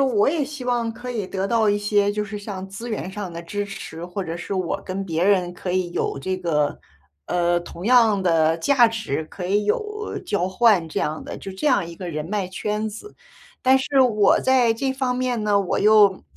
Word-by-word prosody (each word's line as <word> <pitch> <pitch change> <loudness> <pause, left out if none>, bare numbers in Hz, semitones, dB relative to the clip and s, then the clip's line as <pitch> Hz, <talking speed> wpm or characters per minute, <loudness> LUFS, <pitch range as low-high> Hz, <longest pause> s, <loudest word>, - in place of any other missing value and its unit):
我 255 -4 +3
也 300 -1 0
希 290 -2 -8
望 240 -2 0
可 245 +2 -7
以 215 -5 -3
得 190 +1 -2
到 225 -2 +2
一 205 - +3
些 205 0 +2
就 210 0 -2
是 210 0 -6
像 200 -2 -6
资 215 +5 -7
源 210 -4 -4
上 195 -3 -6
的 170 0 -7
支 205 +4 -3
持， 175 -4 -8
或 180 +2 -4
者 165 -1 -5
是 195 - -5
我 185 +1 -2
跟 195 +1 -4
别 165 0 -1
人 185 -3 +2
可 180 0 -5
以 185 -2 0
有 170 - -2
这 185 +6 -2
个， 155 -5 0 0.5
呃， 175 0 +1
同 175 +1 -9
样 225 -4 +4
的 165 -2 +3
价 245 +6 +5
值， 220 -10 -3
可 180 +3 -8
以 205 +3 +1
有 425 - -2
交 200 -4 0
换 190 -4 +3
这 - - -2
样 155 +1 -3
的 - - -6
就 195 - -7
这 190 +11 -4
样 250 -9 +3
一 170 0 -9
个 180 0 -6
人 155 -2 -4
脉 200 +2 -2
圈 210 +4 -3
子。 220 - -10 0.5
但 260 0 +5
是 270 +1 +1
我 215 -5 +4
在 255 -3 +3
这 265 +3 -1
方 260 -2 -1
面 250 -3 -1
呢， 205 -1 +3
我 190 - -1
又 210 -2 +5
205 Hz, 235 characters per minute, -23 LUFS, 180-235 Hz, 0.5 s, 价